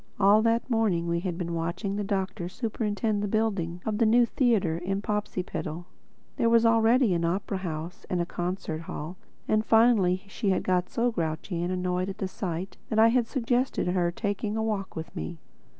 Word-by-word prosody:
All 205 +2 +6
that 230 +1 +1
morning 215 -8 +1
we 170 0 +1
had 175 -1 -3
been 170 -2 -3
watching 170 +5 -2
the 205 - -1
Doctor 190 -2 -2
superintend 210 0 -1
the 205 - -1
building 195 -5 -1
of 215 -1 -1
the 230 - +4
new 240 +2 +5
theatre 215 - +1
in 195 +3 -2
Popsipetel—there 185 0 -4
was 230 0 +5
already 230 0 +4
an 170 -1 0
opera 190 +3 -1
house 170 -1 -5
and 180 - 0
a 175 - +1
concert 175 -2 -3
hall; 165 +1 -6 0.3
and 215 0 +2
finally 220 -5 +4
she 200 +1 -2
had 190 - +1
got 180 -1 +1
so 240 +1 +1
grouchy 165 -1 -3
and 175 +1 -1
annoyed 180 0 -1
at 195 - -6
the 190 - -2
sight 185 0 -4
that 220 - -1
I 225 +1 +7
had 240 -1 +2
suggested 245 -4 0
her 180 -1 +1
taking 205 +3 -2
a 220 - 0
walk 210 -3 -2
with 160 0 -7
me. 80 +1 -5
195 Hz, 185 wpm, -27 LUFS, 175-220 Hz, 0.3 s, I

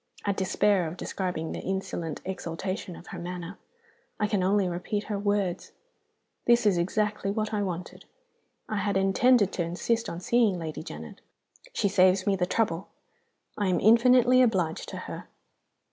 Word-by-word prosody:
I 200 - +2
despair 195 -1 +1
of 165 +3 -7
describing 180 -4 -3
the - - -4
insolent 175 -4 -4
exultation 185 +1 -4
of - - -12
her - - -5
manner. 180 +1 -6 0.6
I 210 - +2
can 205 -2 0
only 195 +1 +2
repeat 180 +4 -3
her 205 -1 -3
words: 200 -3 -1 0.7
'This 240 -1 +4
is 200 -4 +4
exactly 210 +3 0
what 215 +1 -2
I 210 - 0
wanted! 180 -3 -5 0.6
I 215 - -2
had 200 -1 0
intended 200 +3 +4
to 175 - -1
insist 205 +7 -1
on 170 - -5
seeing 220 0 +2
Lady 160 -2 -5
Janet: 75 - -9 0.5
she - - +1
saves 185 -1 +4
me 200 - +2
the 180 -2 0
trouble. 190 -3 0 0.7
I 205 - +1
am 185 - +2
infinitely 250 +3 +6
obliged 185 -10 +1
to - - -6
her. - - -7
195 Hz, 160 wpm, -27 LUFS, 180-210 Hz, 0.7 s, infinitely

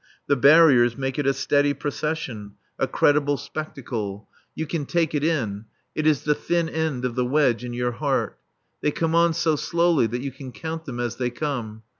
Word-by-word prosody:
The 140 - +2
barriers 140 -3 +6
make 135 +1 -2
it 145 - 0
a - - +5
steady 145 +2 +1
procession, 140 -9 -4 0.2
a - - +1
credible 145 -1 +2
spectacle. 115 -11 -5 0.3
You 160 - -3
can 150 -2 -3
take 165 -3 0
it 150 -1 0
in. 115 -10 -1 0.3
It 155 0 0
is 150 -3 +2
the 150 - +3
thin 170 +2 -1
end 160 -6 -2
of 125 - -2
the 125 - 0
wedge 125 -3 +2
in 120 -1 -5
your 120 0 -1
heart. 135 +3 -1 0.4
They - - +2
come 160 +2 -1
on 170 0 +4
so 160 -1 +2
slowly 170 -4 +2
that 120 +3 -4
you 140 - -3
can 130 -1 -10
count 160 +8 -6
them 125 -5 -6
as 120 -1 -2
they 125 -1 -1
come. 120 -5 -4
140 Hz, 195 wpm, -24 LUFS, 120-155 Hz, 0.4 s, barriers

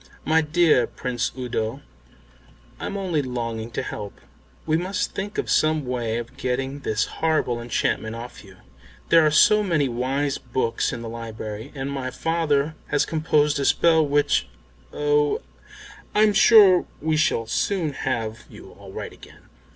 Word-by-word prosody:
"My 160 +1 +4
dear 160 -3 +3
Prince 125 -2 -3
Udo, 120 -3 -3 1.0
I'm 200 - -4
only 180 -6 0
longing 115 -3 -4
to - - -2
help. 100 -1 -7 0.5
We 155 - +1
must 185 +4 -2
think 205 +2 -5
of - - -1
some 155 -2 +2
way 120 -3 -2
of 120 0 -7
getting 135 +2 -2
this 110 -5 -1
horrible 155 -7 -1
enchantment 115 -1 -1
off 120 +1 -9
you. 95 -2 -16 0.5
There 165 -1 +6
are 155 - +4
so 210 +8 +5
many 165 -8 +1
wise 135 +4 -1
books 120 -1 -1
in 120 -1 -6
the - - -6
library, 110 -2 -7
and 135 0 -4
my 135 -2 -3
father 155 -1 0
has 145 0 +1
composed 150 -2 +1
a 140 - 0
spell 160 +1 +4
which 145 0 +1 0.4
oh, 150 0 +1 0.8
I'm 210 0 +4
sure 200 -3 +6
we 155 0 0
shall 135 -7 +1
soon 160 - -1
have 115 -4 -3
you - - -13
all - - -11
right - - -7
again." - - -17
140 Hz, 150 wpm, -23 LUFS, 120-160 Hz, 1.0 s, There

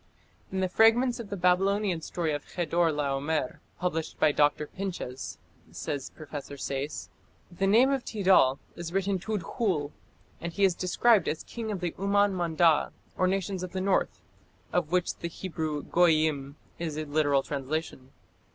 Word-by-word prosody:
"In 190 0 -1
the 185 - +2
fragments 235 +5 +4
of 225 -4 -7
the 200 - -4
Babylonian 185 0 +2
story 160 -1 -2
of 145 - -5
Chedor 170 -1 +1
laomer 145 -1 -1 0.2
published 165 -3 -2
by 150 - +5
Dr. 145 +1 +2
Pinches", 170 -8 -5 0.3
says 135 - -4
Professor 145 -2 -7
Sayce, 140 +2 -4 0.4
"the 195 +3 0
name 240 +7 +5
of 270 -3 0
Tid^{c}al 185 - +4 0.2
is 170 -1 -6
written 195 +1 0
Tudkhul, 190 - -1 0.5
and 170 0 -5
he 200 - 0
is 190 -2 +5
described 190 +3 +3
as 155 - -2
King 225 -2 -5
of 195 -3 -4
the 175 -2 -1
Umman 200 +1 +3
Manda, 170 -3 +3 0.2
or 185 - +2
Nations 190 0 -1
of 185 -1 -6
the 190 - -2
North, 185 - 0 0.5
of 170 -3 0
which 180 -1 +1
the 170 - -4
Hebrew 160 -4 -4
Goyyim 155 -5 +2 0.2
is 160 -3 -3
a 155 - -2
literal 145 -2 +2
translation. 140 -1 -4
170 Hz, 155 wpm, -28 LUFS, 150-195 Hz, 0.5 s, by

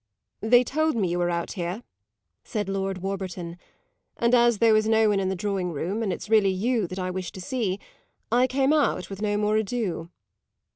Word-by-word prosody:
"They 245 +3 +5
told 310 +4 0
me 200 -6 +1
you 175 +1 -1
were 175 0 +1
out 170 -1 -2
here," 180 +4 -4 0.6
said 210 -3 -3
Lord 195 -1 -3
Warburton; 185 -3 -4 0.6
"and 235 +1 +2
as 240 -2 +5
there 225 +1 +5
was 215 0 +3
no 220 -1 +4
one 205 -1 +2
in 190 -1 0
the 190 - -1
drawing 190 -1 -2
room 180 +8 -3
and 210 -4 0
it's - - -5
really 215 -2 +4
you 210 +2 0
that 185 - -7
I 185 -1 -2
wish 185 0 -4
to - - -8
see, 205 -3 -2 0.5
I 245 +2 +4
came 270 +2 +2
out 275 - +1
with 195 +1 -7
no 205 -1 0
more 210 +1 +2
ado." 205 -6 -2
205 Hz, 200 wpm, -25 LUFS, 185-230 Hz, 0.6 s, They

